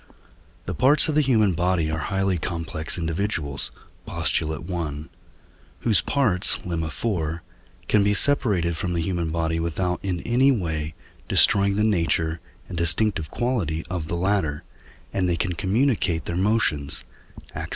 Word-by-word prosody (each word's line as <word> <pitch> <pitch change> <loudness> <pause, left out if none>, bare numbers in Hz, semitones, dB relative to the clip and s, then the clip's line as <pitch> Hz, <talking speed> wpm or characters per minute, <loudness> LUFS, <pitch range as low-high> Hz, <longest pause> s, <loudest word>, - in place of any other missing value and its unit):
The - - -3
parts 135 +4 +4
of 155 - 0
the 150 - +4
human 110 -8 +3
body 85 -2 0
are 80 - -2
highly 95 +2 -1
complex 80 -1 -3
individuals 80 -4 -2 0.4
(Post. - - 0
i.), 85 +1 -3 0.9
whose 110 -4 +3
parts 115 -11 +3
(Lemma 85 -3 -2 0.5
iv.) 85 - -8 0.5
can 105 -2 +3
be 100 0 +2
separated 100 - +1
from 90 0 -3
the 85 - 0
human 85 -2 -2
body 80 0 -1
without 90 +2 -2
in 90 -3 -2
any 125 +4 +3
way 80 - -2 0.3
destroying 100 0 +5
the 105 - +1
nature 85 -5 +1 0.3
and - - -7
distinctive 85 0 +2
quality 100 - -2
of 85 -4 -3
the 85 - -2
latter, 85 -5 0 0.5
and 90 -2 0
they 85 - +1
can 90 +3 -1
communicate 100 - 0
their 85 - -3
motions 90 -8 +1 0.5
(Ax. - - -5
90 Hz, 145 wpm, -24 LUFS, 80-105 Hz, 0.9 s, destroying